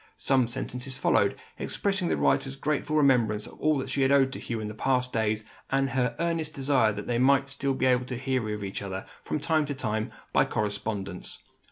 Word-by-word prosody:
Some 130 -3 +3
sentences 125 +1 -4
followed, - - +2 0.2
expressing 195 -3 -1
the - - +1
writer's 135 -1 +1
grateful 150 +1 -1
remembrance 120 -8 +3
of - - -11
all 155 -1 +2
that 130 0 -3
she 135 +1 0
had 135 0 +3
owed 135 -1 +4
to - - -5
Hugh 115 -2 -4
in 105 0 -4
past 125 +1 0
days, 110 -1 0 0.3
and 135 0 +1
her 125 -1 0
earnest 165 -2 -1
desire 135 -5 +3
that 105 0 -6
they 120 -1 0
might 135 +1 +4
still 135 -1 -1
hear 130 -1 +4 0.6
of 105 - -6
each 95 -1 -4
other, 95 -1 -5 0.2
from 150 - -2
time 155 +1 +2
to 145 - -3
time, 110 -3 -2 0.2
by - - +5
correspondence. 100 -2 -3
130 Hz, 190 wpm, -28 LUFS, 110-140 Hz, 0.6 s, by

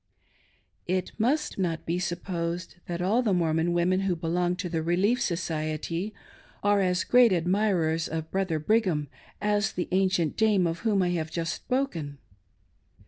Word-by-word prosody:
It 185 0 -1
must 275 +2 0
not 170 -3 -1
be 170 +2 -1
supposed 175 0 -3
that 175 0 -3
all 215 +7 +3
the 210 -6 +1
Mormon 165 0 +1
women 175 +2 +2
who 190 -2 0
belong 175 +2 0
to 180 0 -4
the 165 -2 -2
Relief 190 +9 +1
Society 165 +2 -2 0.5
are 205 0 +3
as 180 -1 +1
great 245 -2 +5
admirers 175 -3 +1
of 160 0 -5
Brother 190 -4 0
Brigham 160 - +1 0.3
as 205 -1 +1
the 175 - -2
ancient 185 -4 +1
dame 210 -4 +3
of 165 0 -1
whom 210 -4 +2
I 180 - +1
have 165 -3 -2
just 165 0 -2
spoken. 170 - -2
180 Hz, 150 wpm, -27 LUFS, 165-200 Hz, 0.5 s, great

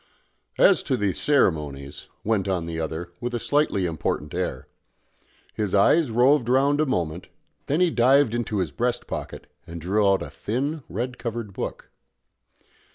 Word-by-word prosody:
"As - - +5
to 130 - +2
the 100 -4 0
ceremonies 75 - 0
" - - -43
went 105 -3 0
on 90 -3 -1
the 85 -1 -4
other, 80 +2 -4
with 120 0 -3
a - - -1
slightly 145 -9 +1
important 75 -3 -3
air. 85 -8 -3 0.9
His 105 -2 -1
eyes 140 +9 +4
roved 125 +2 +3
round 140 +3 +3
a 155 - +1
moment; 85 -7 -2 0.4
then 150 +5 +1
he 180 -2 +4
dived 130 0 +4
into 120 -3 -2
his 90 -7 -1
breast 120 - -1
pocket, - - -6 0.2
and 85 0 -7
drew 100 +5 +1
out 95 -1 +2
a 70 - -8
thin 140 - -3
red 125 +6 -4
covered 115 -4 -5
book. - - -6
105 Hz, 160 wpm, -24 LUFS, 85-125 Hz, 0.9 s, As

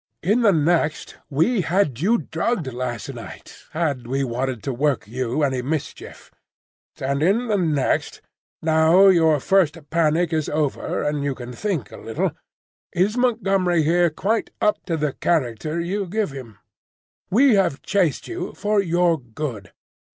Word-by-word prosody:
In 210 +8 +2
the 215 -4 +5
next, 160 -1 0
we 175 - +2
had 160 - 0
you 215 +9 +3
drugged 190 - -2
last 120 -2 -4
night, - - -11
had 145 -7 -2
we 135 +2 -1
wanted 125 -2 -3
to 135 - -2
work 135 -5 0
you 125 +5 -2
any 130 -3 0
mischief; 150 +4 -5 0.7
and 140 +1 -1
in 215 +9 +2
the 210 - +2
next, 155 -7 0 0.4
now 160 +4 +5
your 160 -5 +4
first 170 0 +2
panic 165 +1 +2
is 155 -2 0
over 150 -2 -1
and 150 -1 -1
you 140 -2 -1
can 125 0 -8
think 170 - -3
a - - -10
little, 115 - -2 0.6
is 190 +5 +1
Montgomery 195 -9 +2
here 170 +2 +3
quite 210 +8 -1
up 210 - +1
to 165 -3 0
the 150 -3 -1
character 155 0 -1
you 190 +3 -2
give 205 -2 -1
him? 125 -6 -10 0.7
We 255 +5 +5
have 180 -8 +1
chased 185 -7 0
you 355 0 -5
for 210 0 +1
your 175 -2 +2
good. 115 - -6
160 Hz, 150 wpm, -22 LUFS, 135-195 Hz, 0.7 s, the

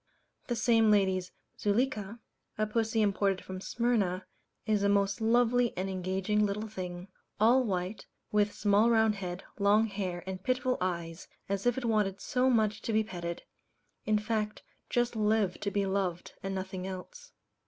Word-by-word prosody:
The 240 - -1
same 225 -1 +4
lady's 190 -3 +2 0.3
"Zuleika," 215 -1 0 0.4
a 215 - +1
pussy 220 0 +1
imported 195 -1 +1
from 185 0 -7
Smyrna, 200 -6 0 0.4
is 215 -2 +2
a 200 - +3
most 200 +2 +2
lovely 240 +1 +3
and 190 +1 -2
engaging 190 +3 0
little 210 +2 -1
thing 180 -3 -6 0.3
all 240 +5 +5
white, 190 -1 -3 0.2
with 210 0 +3
small 205 +3 +3
round 220 -2 +4
head, 185 -2 -5 0.2
long 205 +2 +4
hair, 190 -4 -4
and 190 0 -5
pitiful 255 +3 0
eyes, 170 -2 -3 0.2
as 200 +3 -1
if 245 - +2
it 260 - -2
wanted 210 -4 +1
so 255 +1 +1
much 215 -4 +2
to - - -3
be 220 0 +3
petted 170 -4 -5 0.6
in 215 0 +2
fact 215 0 -2 0.3
just 240 -1 +1
lived 210 -3 +1
to 200 - 0
be 200 -1 0
loved, 190 -3 -2
and 195 0 -3
nothing 190 0 -4
else. 485 - -8
205 Hz, 160 wpm, -30 LUFS, 190-225 Hz, 0.6 s, all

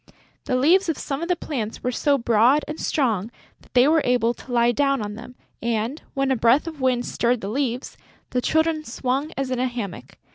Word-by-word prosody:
The 255 - 0
leaves 335 +8 +4
of 320 - 0
some 275 +1 -4
of 335 - -2
the 360 - +2
plants 240 -10 -5
were 250 - 0
so 280 +3 +2
broad 235 +4 +3
and 305 +1 -6
strong 225 -8 0 0.3
that - - -24
they 250 +2 +6
were 315 +1 +4
able 245 -1 +2
to 250 - -13
lie 240 0 +3
down 275 +2 +1
on 210 -1 -4
them; 240 +3 -10 0.3
and, 235 +5 -2
when 275 -1 +1
a - - +3
breath 240 +6 +3
of 315 -4 -7
wind 250 -2 +1
stirred 240 -1 0
the 195 - -4
leaves, 255 +1 -2 0.3
the 250 - 0
Children 315 +2 +1
swung 265 +4 -2
as 270 -1 -2
in 255 - -1
a 255 - +1
hammock. 200 - -6
255 Hz, 215 wpm, -23 LUFS, 235-285 Hz, 0.3 s, they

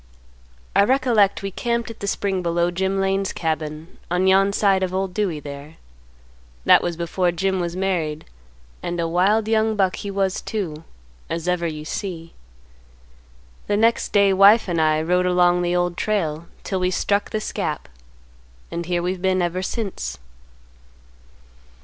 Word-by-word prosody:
I 200 - +6
recollect 225 -5 +2
we 195 - -3
camped 235 +3 -2
at 225 - -13
the 200 - -4
spring 195 -2 -1
below 170 0 0
Jim 190 +2 -1
Lane's 195 0 0
cabin 155 0 -4
on 180 +2 +1
yon 195 +1 +4
side 200 -1 +2
of 185 0 -1
Old 190 -1 -2
Dewey, 185 -7 -1
there. 145 +2 -9 0.9
That - - +7
was 170 -2 -3
before 175 +1 0
Jim 190 +2 -1
was 175 -1 -3
married, 170 -5 -2 0.6
and 175 0 -3
a 165 - 0
wild 195 +6 +2
young 220 0 +2
buck 190 -3 +1
he 205 - -5
was 195 -1 -1
too, 165 -8 -4 0.5
as 165 +1 -3
ever 180 -1 +1
you 155 -1 -6
see. 165 -1 -5 1.3
The 205 - +1
next 230 +2 +2
day 200 -1 +4
wife 200 +4 +6
and 170 -3 0
I 155 0 +2
rode 180 +2 +2
along 180 0 +3
the 175 0 0
Old 175 -1 0
Trail 170 -6 -1 0.2
'til 190 - -2
we 180 0 +1
struck 200 +2 0
this 215 0 -3
gap, - - -3 0.8
and 170 0 -4
here 175 -1 0
we've 180 0 -2
been 190 0 +2
ever 175 +1 -1
since. 200 +1 -4
185 Hz, 160 wpm, -22 LUFS, 170-200 Hz, 1.3 s, That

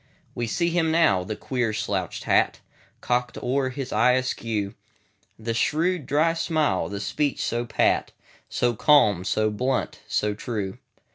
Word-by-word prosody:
We 120 - -3
see 170 +9 0
him 165 -1 +2
now—the 110 - +2
queer 120 -1 -2
slouched 100 -4 -2
hat, - - +2 0.4
Cocked 125 0 -1
o'er 130 +1 0
his 130 0 -5
eye 120 +4 +4
askew; 115 -5 -1 0.6
The 115 +1 -3
shrewd, 160 +5 0
dry 155 +4 +3
smile; 155 - 0
the 100 - -4
speech 145 +7 -1
so 120 +1 -1
pat, 120 - +1 0.4
So 120 -1 +1
calm, 105 - +4
so 110 +2 +1
blunt, 125 +5 -1
so 105 0 0
true. 105 -3 -4
120 Hz, 140 wpm, -25 LUFS, 105-145 Hz, 0.6 s, eye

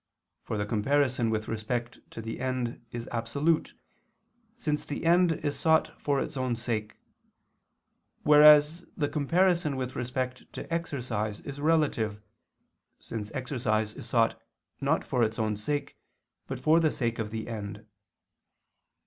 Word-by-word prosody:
For 110 - -4
the 105 - -1
comparison 125 +2 +1
with 110 -1 -1
respect 120 +2 -3
to 115 - -8
the 115 0 -5
end 125 -2 -2
is 120 0 -5
absolute, 140 +8 0 0.8
since 150 -11 -1
the 145 +2 -5
end 175 0 +5
is 145 -2 -3
sought 160 -1 +3
for 140 -2 +1
its 155 - -3
own 130 -2 0
sake; 110 -2 -3 1.3
whereas 150 +2 +7
the 145 - +1
comparison 165 +1 +2
with 130 -1 -4
respect 125 +1 -3
to - - -6
exercise 120 -10 -2
is 140 0 -7
relative, 145 -10 +1 0.8
since 105 -2 -6
exercise 110 -5 -1
is 115 - -8
sought 115 -1 +2 0.4
not - - +1
for 125 - 0
its 110 -1 +1
own 110 -2 0
sake, 145 +8 -3 0.5
but 135 - -4
for 155 +6 +4
the 160 -2 +3
sake 115 -2 -1
of 110 -2 -2
the 110 0 -5
end. 105 -2 -6
125 Hz, 140 wpm, -28 LUFS, 110-150 Hz, 1.3 s, whereas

